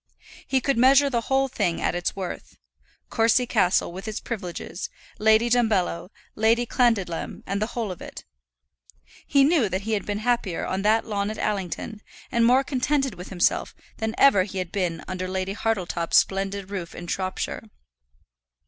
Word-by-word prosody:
He 265 -1 +1
could 275 -3 +1
measure 275 +3 +6
the 235 -2 +1
whole 270 +3 +1
thing 175 -9 -1
at - - 0
its 175 0 -2
worth, 190 -2 -6 0.5
Courcy 230 +2 +3
Castle 195 -8 +2
with 190 +4 -8
its 215 0 -3
privileges, 185 -4 -5 0.3
Lady 220 +2 +4
Dumbello, 220 -8 +1 0.2
Lady 225 +2 +2
Clandidlem, 225 -9 0
and 200 +1 -2
the 215 - +1
whole 225 -5 -1
of 180 - -9
it. - - -9 1.0
He 280 0 +4
knew 285 - +3
that 185 +1 -2
he 220 +3 -4
had 210 -2 0
been 205 0 -1
happier 235 -8 0
on 190 - -2
that 220 +2 +3
lawn 205 -1 -2
at 215 - -5
Allington, 210 +1 -3 0.3
and 235 -2 +2
more 255 +3 +5
contented 270 0 0
with 180 +1 -9
himself, 180 -2 0 0.2
than 220 +1 -2
ever 275 -9 +6
he 190 +1 -4
had 180 -2 -3
been 185 -4 0
even 165 - -10
under 185 0 -4
Lady 190 +1 -2
Hartletop's 185 -6 0
splendid 195 0 0
roof 180 -4 -5
in 175 - -7
Shropshire. 185 +2 -3
210 Hz, 170 wpm, -25 LUFS, 185-235 Hz, 1.0 s, measure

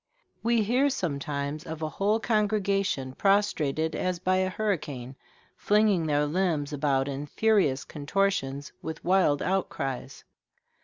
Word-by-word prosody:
We 230 -1 +2
hear 250 +7 +2
sometimes 145 - -3
of 160 0 -6
a 155 - -1
whole 205 +7 +1
congregation 200 - 0
prostrated 160 -5 +1
as 185 -1 -1
by 185 +2 +1
a 185 0 +1
hurricane, 150 - -3 0.4
flinging 205 -5 +2
their 150 0 +2
limbs 155 -3 0
about 140 -2 +1
in 140 +1 -4
furious 190 -8 +2
contortions, 145 -3 -1
with 160 0 -6
wild 180 -6 +3
outcries. 160 -8 -3
165 Hz, 120 wpm, -27 LUFS, 145-200 Hz, 0.4 s, wild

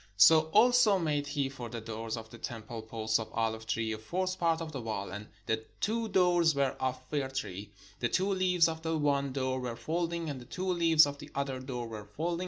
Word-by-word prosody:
So 155 +9 +7
also 245 +1 +5
made 150 -4 0
he 145 -1 0
for 125 -3 -7
the 115 - -5
door 110 0 -6
of 110 -1 -9
the 115 - -11
temple 115 -1 -6
posts 110 0 -1
of 110 0 -6
olive 110 -1 -1
tree, 110 0 -1
a 110 - -4
fourth 185 +10 -2
part 165 -1 +2
of 165 -1 -5
the 135 -4 -5
wall. 110 -3 -4
And 105 +2 -7 0.2
the 110 0 -1 0.2
two 225 +1 0
doors 175 -4 +4
were 140 -2 +1
of 130 0 -1
fir 140 -3 -1
tree: 105 -7 -5 0.3
the 120 - 0
two 190 +2 +1
leaves 180 -3 +3
of 160 0 -4
the 160 0 -1
one 140 -2 +1
door 130 -1 -1
were 125 -2 -4
folding, 170 +4 -2
and 140 -4 -4
the - - -11
two 185 +7 -2
leaves 165 -3 +6
of 145 0 -5
the 145 - -10
other 135 -2 -2
door 125 -2 -5
were 110 -2 -7
folding. 165 +11 -3
140 Hz, 225 wpm, -31 LUFS, 115-165 Hz, 0.3 s, So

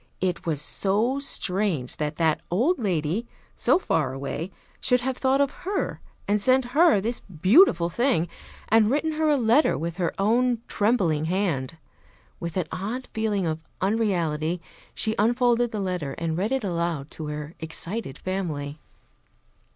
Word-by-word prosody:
It 180 -2 -2
was 155 -4 0
so 210 - 0
strange 185 - +1
that 150 0 -2
that 160 -1 +1
old 255 - +2
lady, 185 +1 -1 0.3
so - - +3
far 150 - 0
away, 140 +6 -4 0.3
should 250 0 +2
have 260 +1 -1
thought 265 +1 +2
of 280 -1 +2
her 385 +2 -2 0.3
and 205 0 +2
sent 260 +3 +4
her 315 - +5
this 230 +5 -2
beautiful 185 - +4
thing, 230 -2 +1 0.4
and 220 -1 +4
written 300 +5 +1
her 310 0 +1
a 295 - +4
letter 245 +5 +3
with 165 +2 -4
her 175 -3 0
own 235 +4 +2
trembling 190 -9 +1
hand. 165 -6 -1 0.6
With 170 +1 -4
an 180 - 0
odd 225 +7 -4
feeling 215 -4 0
of 160 -1 -3 0.2
unreality 180 -6 0 0.4
she 220 - 0
unfolded 240 +2 +3
the 215 - -4
letter 180 -8 -2
and 165 -1 -2
read 200 +7 -1
it 265 -3 0
aloud 170 -6 -2
to 155 - -6
her 150 +1 -5
excited 165 +2 -3
family. 155 -6 -4
195 Hz, 150 wpm, -25 LUFS, 165-240 Hz, 0.6 s, her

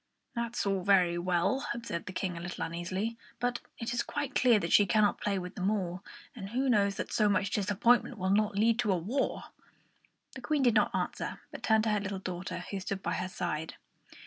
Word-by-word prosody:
"That's 235 -1 -2
all 195 -1 +1
very 180 -3 +4
well," 180 +9 +1
observed 235 -9 -5
the - - -4
King, 185 -1 -3
a - - -5
little 175 +1 -4
uneasily; 185 +7 -3 0.2
"but 245 0 0 0.2
it 230 +1 -3
is 240 - +1
quite 290 -2 -3
clear 245 -3 +5
that 170 -4 -2
she 205 - +6
cannot 210 +2 +3
play 200 -1 0
with 180 -1 -5
them 190 -1 0
all, 185 -3 -2 0.3
and 195 -5 -7
who 260 +4 0
knows 200 -3 +3
that - - -4
so 210 -2 +3
much 200 0 +1
disappointment 225 +5 +2
will 190 0 0
not 210 0 +2
lead 225 +2 +3
to 215 -5 +2
a 185 - +2
war?" 230 +11 -1 0.9
The 260 - -8
Queen 295 +1 0
did 240 -3 +5
not 210 -2 +2
answer - - -3
but - - -8
turned 220 -1 +3
to 220 - +1
her 210 - +2
little 200 0 -3
daughter, 180 -1 -5
who 200 - -2
stood 190 +1 -4
by 170 - -1
her 180 +2 -2
side. 160 -3 -3
200 Hz, 215 wpm, -31 LUFS, 185-230 Hz, 0.9 s, she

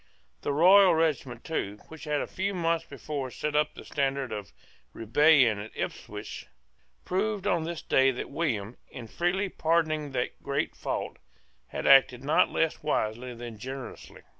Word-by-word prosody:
The - - -1
Royal 180 +4 +6
regiment 140 -7 -1
too, 105 -10 -3
which 160 -2 -10
had 150 -1 0
a - - -2
few 195 +1 -3
months 165 -2 0
before 140 -1 -5
set 150 +4 -4
up 150 0 +1
the - - -10
standard 135 -3 -1
of 105 -2 -6 0.4
rebellion 120 -1 +4
at 105 +2 -7
Ipswich, - - -6 0.6
proved 200 +1 -1
on 170 -5 +1
this 170 -1 -5
day 135 0 +4
that 130 +1 -4
William, 125 -8 -2
in 120 - -8
freely 175 - 0
pardoning 160 -4 0
that 125 - -3
great 140 0 -2
fault, - - -4 0.5
had - - -5
acted 130 -2 +6
not 145 +3 +3
less 165 -1 0
wisely 125 -4 -2
than 115 -2 -8
generously. 130 +2 -8
145 Hz, 155 wpm, -28 LUFS, 125-165 Hz, 0.6 s, Royal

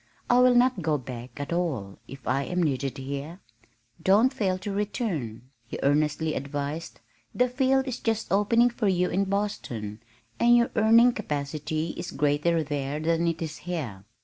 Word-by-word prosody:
"I 245 - +6
will 250 0 +6
not 245 -4 +3
go 155 -2 +1
back 125 0 -9
at 145 +3 -3
all 135 - -2
if 135 0 -11
I 130 +2 +1
am 180 0 0
needed 135 -4 -1
here." 140 +6 -6 0.6
"Don't 220 +8 +4
fail 195 -8 0
to 190 +2 -5
return," 170 - -3 0.2
he - - -5
earnestly 150 +2 +1
advised. 145 +3 -4 0.4
"The 250 - +3
field 265 +1 +1
is 255 - -3
just 225 -1 -2
opening 230 +4 +4
for 230 -3 -1
you 180 -1 +1
in 195 +3 +1
Boston, 120 - -3 0.4
and 240 0 +6
your 235 - +2
earning 230 +3 +6
capacity 150 +1 -3
is - - -6
greater 150 +3 +1
there 145 0 -3
than 165 +2 +1
it 165 0 -1
is 160 -1 -5
here. 125 - -4
165 Hz, 165 wpm, -26 LUFS, 140-210 Hz, 0.6 s, I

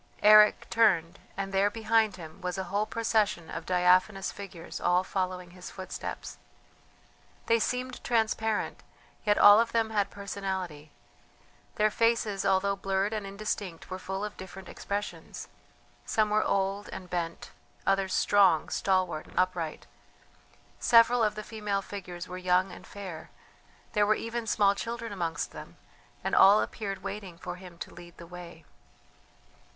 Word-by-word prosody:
Eric 210 0 +7
turned, 190 -6 +3 0.2
and 195 0 -3
there, 195 +1 +3
behind 220 -2 +1
him, 160 -3 -11
was 180 0 -3
a 190 - -2
whole 210 +1 +1
procession 210 -7 0
of 165 - -6
diaphanous 185 +2 +3
figures 180 -4 -8
all 180 +1 +3
following 185 -2 -3
his 180 0 -10
footsteps. 185 -1 -7 1.1
They 230 0 +3
seemed 250 +2 -2
transparent, 220 -2 0 0.4
yet 205 -1 +3
all 205 +1 +9
of 230 0 +1
them 225 -1 +1
had 205 -2 +1
personality; 190 -6 -5 0.9
their 215 0 +3
faces 230 -3 +1
although 195 +1 +2
blurred 195 +1 -1
and 210 -2 -3
indistinct 195 -4 -5
were 185 - -4
full 190 +2 -4
of 210 - -8
different 190 -1 -10
expressions. 205 +1 -5 0.6
Some 215 -1 +1
were 215 0 +3
old 195 +1 -1
and 185 - -8
bent, 170 -2 -4 0.3
others 195 -1 +1
strong, 190 -6 +4
stalwart, 185 -5 0
upright. 180 -4 -1 0.9
Several 235 0 +5
of 210 -1 +1
the 215 - -5
female 210 -3 -3
figures 180 -3 -7
were 180 0 -6
young 185 +1 +2
and - - -12
fair; 185 -6 -8 0.6
there 210 -2 +3
were 215 - +4
even 230 +1 -4
small 200 -2 +4
children 230 +2 -5
amongst 165 -5 -3
them, - - -11 0.5
and - - -2
all 200 +2 +7
appeared 195 -4 -4
waiting 195 -3 -6
for 180 - -6
him 180 -2 -12
to - - -8
lead 175 -1 -13
the 170 - -10
way. 170 -2 -11
195 Hz, 145 wpm, -29 LUFS, 180-215 Hz, 1.1 s, all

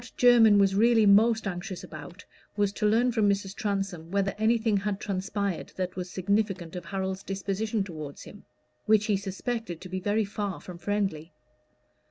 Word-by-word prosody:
What 245 - -13
Jermyn 235 -4 +6
was 195 -1 +4
really 225 +2 +4
most 220 +3 +5
anxious 185 0 -5
about, 170 +6 -10 0.3
was 205 -1 +1
to 210 - 0
learn 235 +4 +3
from 220 -3 +2
Mrs. 195 -1 -1
Transome 195 -6 -3
whether 195 +1 0
anything 220 -1 +2
had 200 0 -2
transpired 195 -2 -3
that 185 -1 -3
was 180 0 -5
significant 195 -2 -1
of 175 -1 -6
Harold's 190 0 -3
disposition 200 +2 -2
toward 155 -6 -8
him, 205 - -12 0.4
which 215 -1 +4
he 210 - +2
suspected 200 -1 -4
to 185 - -10
be 185 +1 -3
very 205 +3 0
far 205 -2 -4
from 180 -2 -10
friendly. 180 -5 -2
200 Hz, 170 wpm, -27 LUFS, 185-215 Hz, 0.4 s, Jermyn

